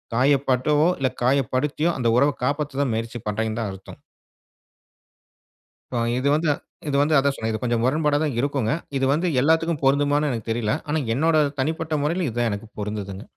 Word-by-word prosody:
காயப்பட்டவோ 140 +3 +3
இல்ல 135 - +2
காயப்படுத்தியோ, 140 +5 +1
அந்த 120 -3 0
உறவை 145 +2 +3
காப்பாத்த 140 -1 -1
முயற்சி 115 +2 -3
பண்றீங்கன்னு 110 +1 -2
தான் 105 -3 -3
அர்த்தம். 95 0 -11 1.9
ப - - 0 0.2
இது 135 - 0
வந்து 155 0 0 0.4
இது 140 - -1
வந்து 155 +2 +2
அதுதான் 140 0 +2
சொன்னேன். 110 -3 -3
இது 110 - -3
கொஞ்சம் 120 -2 0
முரண்பாடா 150 +2 +2
தான் 145 -5 -1
இருக்குங்க. 135 -4 0 0.3
இது 135 - +1
வந்து 170 +5 0
எல்லாத்துக்கும் 160 +1 +2
பொருந்துமான்னு 145 +2 +2
எனக்கு 115 -1 -5
தெரில. 115 0 0
ஆனா 155 +1 0 0.2
என்னோட 160 +3 +2 0.2
தனிப்பட்ட 160 +2 -2
முறையில, 170 +4 0
இது 110 - -9
தான் 120 -1 +2
எனக்கு 100 +2 -5
பொருந்துதுங்க. 100 -1 -5
135 Hz, 160 wpm, -23 LUFS, 115-150 Hz, 1.9 s, காயப்பட்டவோ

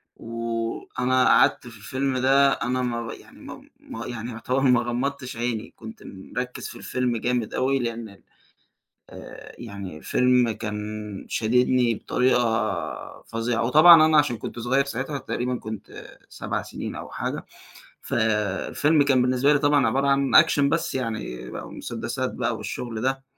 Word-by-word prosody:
وأنا 115 +2 -1
قعدت - - +4
في 115 -2 -11
الفيلم 130 +5 -2
ده 135 +2 +4
أنا 130 +1 -1
ما 120 -2 -2
ر 110 - -5
يعني - - -15
ما - - -11
ما 115 - -8
يعني 120 0 -5
يعتبر 120 +3 -2
ما 125 -3 +4
غمضّتش 130 +1 -3
عيني 115 -2 -3
كنت 110 0 -11
مركّز 125 +6 -6
في - - -9
الفيلم 125 -2 -1
جامد 120 -1 -1
أوي 135 +1 +1
لأن 115 -2 -4
ال 100 - -18 0.9
آآ - - -11
يعني 100 -7 -7
الفيلم 125 +6 +2
كان 105 -1 -5 0.4
شاددني 125 +1 +2
بطريقة 110 -9 -1
فظيعة، 115 0 -1
وطبعًا 155 +5 +8
أنا 155 -1 +4
عشان 145 -5 +2
كنت 120 - -7
صغيّر 130 +4 +1
ساعتها 140 +2 -4
تقريبًا 125 -1 -3
كنت 110 -2 -9
7 - - -4
سنين - - -7
أو - - -8
حاجة، - - -4 0.6
ف - - -7 0.6
الفيلم 150 0 +3
كان 135 -3 +3
بالنسبة 130 +3 +3
لي 145 - +3
طبعًا 145 -1 +3
عبارة 135 +1 +1
عن 140 +2 +6
action 160 -3 0
بس 165 +3 +1
يعني 115 - -4
بقى - - -7
مسدسات - - -4
بقى - - -1
والشغل 115 -3 -5
ده، 135 +2 -1
125 Hz, 150 wpm, -24 LUFS, 115-135 Hz, 0.9 s, وطبعًا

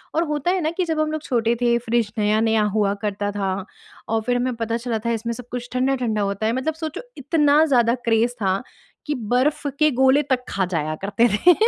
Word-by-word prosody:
और 325 - +3
होता 300 +3 0
है 370 0 0
ना 310 - 0
कि 370 - +1
जब 320 -2 -1
हम 310 0 +1
लोग 310 0 -3
छोटे 235 -3 +1
थे, 235 -1 +3
फ़्रिज़ 235 -2 0
नया-नया 215 +1 +2
हुआ 205 -2 +2
करता 205 -1 -2
था 195 -2 -1 0.6
और 225 0 +1
फिर 245 +3 0
हमें 250 0 -1
पता 230 0 -2
चला 235 -1 -3
था 235 - +1
इसमें 230 +1 -2
सब 245 0 -10
कुछ 245 0 -5
ठंडा-ठंडा 250 -4 0
होता 200 +1 -2
है। 225 - +1
मतलब 265 +6 -1
सोचो 315 -1 -5 0.2
इतना 295 +1 +3
ज़्यादा 240 -5 +3
क्रेज़ 230 +1 +2
था 190 +1 +1 0.4
कि 295 - -1 0.2
बर्फ़ 285 +4 +1
के 305 0 +4
गोले 265 +2 +5
तक 250 -1 -1
खा 190 0 0
जाया 155 0 -1
करते 205 +4 +3
थे। 355 +10 +6
240 Hz, 215 wpm, -22 LUFS, 220-285 Hz, 0.6 s, थे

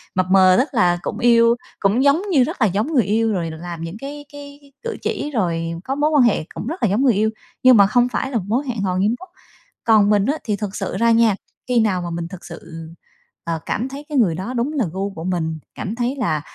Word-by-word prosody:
mập 185 - +2
mờ 185 -1 +6
tức 270 - +1
là 175 -6 +3
cũng - - -4
yêu, 235 0 +5 0.2
cũng 215 +6 +2
giống 285 +5 +4
như 270 -6 +5
rất 305 0 -5
là 215 - +5
giống 205 +8 -1
người 245 -6 +4
yêu 220 +2 +1
rồi 165 -3 -2
làm 170 +1 -7
những 165 +5 -6
cái 290 +1 -8
cái 285 0 -12
cử 465 - -4
chỉ, 350 -10 -3
rồi 165 -7 -1
có 270 - -3
mối 295 +2 +2
quan 290 -5 +4
hệ 220 -9 +2
cũng 215 - -6
rất 330 0 -5
là 215 - +3
giống 210 +7 +1
người 250 -4 +4
yêu, 215 +2 +1 0.3
nhưng 255 -3 +7
mà 200 -1 +6
không 245 +2 +3
phải 265 +2 -2
là 235 - 0
một 190 - -2
mối 245 +7 0
hẹn 230 -5 -3
hò 185 -2 -1
nghiêm 205 +5 +1
túc. 370 - -12 0.5
Còn 215 -3 +4
mình 205 -1 +3
á, 290 +6 0
thì 210 -3 -1
thực 205 -1 -5
sự - - -3
ra 230 0 +3
nha, 225 -3 +4 0.3
khi 245 -2 +2
nào 200 -5 +1
mà 175 - -4
mình 170 0 -4
thực 185 0 -11
sự, 165 -1 -9 0.6
ờ, 165 -1 -2
cảm 245 +5 -2
thấy 280 +2 -8
cái 290 - -1
người 185 -10 +3
đó 195 +8 -5
đúng 250 +5 -1
là 260 -8 0
gu 195 +2 -3
của 165 -3 -7
mình, 160 -3 -2 0.2
cảm 205 +3 -4
thấy 245 +3 -1
là 155 - -1
220 Hz, 255 wpm, -20 LUFS, 185-260 Hz, 0.6 s, nhưng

